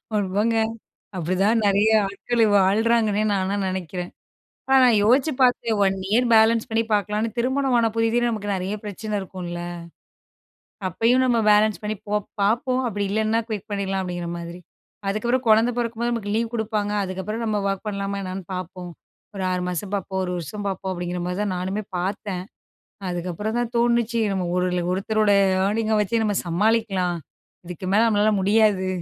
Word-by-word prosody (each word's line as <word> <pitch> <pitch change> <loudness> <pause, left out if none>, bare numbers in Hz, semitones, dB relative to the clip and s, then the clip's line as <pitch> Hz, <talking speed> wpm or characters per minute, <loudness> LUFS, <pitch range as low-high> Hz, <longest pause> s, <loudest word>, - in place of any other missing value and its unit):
ஆமாங்க 205 +3 +1 0.6
அப்படிதான் 195 +7 +1
நிறைய 200 +2 +3 0.2
ஆட்கள் 230 +4 -2 0.2
வாழுறாங்கன்னே 215 +2 +2
நான்லாம் 195 0 -1
நெனைக்கிறேன். 180 -1 -4 0.6
ஆனா 270 - +6
நான் 235 -3 +5
யோசிச்சு 260 +8 +3
பார்த்தேன், 240 -3 +3
"ஒன் 195 0 +2
இயர் 240 +3 +3
பேலன்ஸ் 225 0 +4
பண்ணி 225 0 +1
பார்க்கலான்னு" 210 +2 0
திருமணம் 260 +1 +1
ஆன 230 -1 +3
புதிதுல 230 +1 +2
நமக்கு 205 -2 -4
நிறைய 190 +2 -3
பிரச்சனை 210 +1 -6
இருக்கும்ல, 180 -2 -6 1.3
அப்பயும் 235 +8 +2
நம்ம 240 -2 +2
பேலன்ஸ் 210 0 +3
பண்ணி 215 +1 -3
போ 205 - -1 0.3
பார்ப்போம், 250 +5 +1
அப்படி 205 -2 -2
இல்லைன்னா 220 +2 +1
குயிட் 215 -1 -5
பண்ணிடலாம் 195 -1 -1
அப்படிங்கிற 175 -2 -4
மாதிரி, 170 +1 -8 0.5
அதுக்கப்புறம் 240 +6 0
கொழந்தை 225 +3 +5
பொறக்கும்போது 235 0 -1
நமக்கு 205 -3 -3
லீவ் 230 +1 -1
குடுப்பாங்க, 215 -2 -1
அதுக்கப்புறம் 190 +5 -4
நம்ம 215 -2 0
ஒர்க் 195 +2 -3
பண்ணலாமா 200 -1 -3
என்னன்னு 185 0 -5
பார்ப்போம், 180 0 -6 0.5
ஒரு 190 - -3
6 180 0 -1
மாசம் 180 +3 -4
பார்ப்போம் 190 -1 -2
1 180 - -3
வருஷம் 200 +6 -6
பார்ப்போம் 190 0 -4
அப்படிங்கிற 175 0 -4
மாரி 180 +1 -3
தான் 200 -3 -1
நானுமே 190 +4 -3
பார்த்தேன், 190 0 -3 0.7
அதுக்கப்புறம் 180 +6 -3
தான் 240 -1 -2
தோணுச்சு 235 -1 +2
நம்ம 185 -2 -1
ஒரு 180 0 +1 0.3
"ஒருத்தரோட 215 +2 +1 0.3
ஏர்னிங் 220 +2 0
அ - - +3
வச்சு 225 +3 0
நம்ம 205 -2 0
சமாளிக்கலாம் 195 -1 +1 0.5
இதுக்கு 180 +1 -7
மேல 220 +3 +5
நம்மளால 215 -1 +3
முடியாது" 205 -1 +3
210 Hz, 155 wpm, -23 LUFS, 190-225 Hz, 1.3 s, ஆனா